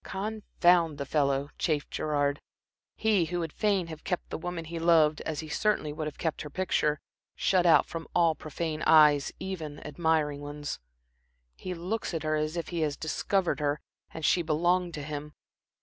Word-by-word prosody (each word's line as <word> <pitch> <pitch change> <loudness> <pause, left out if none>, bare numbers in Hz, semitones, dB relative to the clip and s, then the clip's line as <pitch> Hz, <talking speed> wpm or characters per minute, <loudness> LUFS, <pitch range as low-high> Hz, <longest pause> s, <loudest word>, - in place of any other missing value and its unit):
"Confound 180 -6 +1
the 140 - -3
fellow," 140 0 +1
chafed 150 -3 0
Gerard 145 -2 0 0.5
he 210 -6 +2
who 175 +2 -3
would 165 -3 -3
fain 200 -4 +1
have 160 -2 -9
kept 180 - -3
the - - -2
woman 175 -1 -4
he 165 +1 -5
loved, 160 -2 +4
as 155 -2 -2
he 155 - -8
certainly 155 -3 0
would 155 0 -3
have 150 - -7
kept 160 -2 -2
her 150 - -6
picture, 150 -3 0 0.4
shut 180 -2 +2
out 165 - +6
from 165 -1 -7
all 170 -2 +4
profane 155 0 -4
eyes, 150 -3 +6
even 160 -6 -5
admiring 150 -2 0
ones. 145 0 -5 0.8
"He 185 -1 -5
looks 185 +2 -3
at 160 - -3
her 155 0 +1
as 155 +2 -1
if 170 - -3
he 170 - -3
had 150 -3 -1
discovered 170 0 0
her 145 0 0 0.3
and 160 -1 -4
she 180 - +4
belonged 175 +2 +1
to 150 - -5
him. 150 0 -6
160 Hz, 180 wpm, -29 LUFS, 150-175 Hz, 0.8 s, out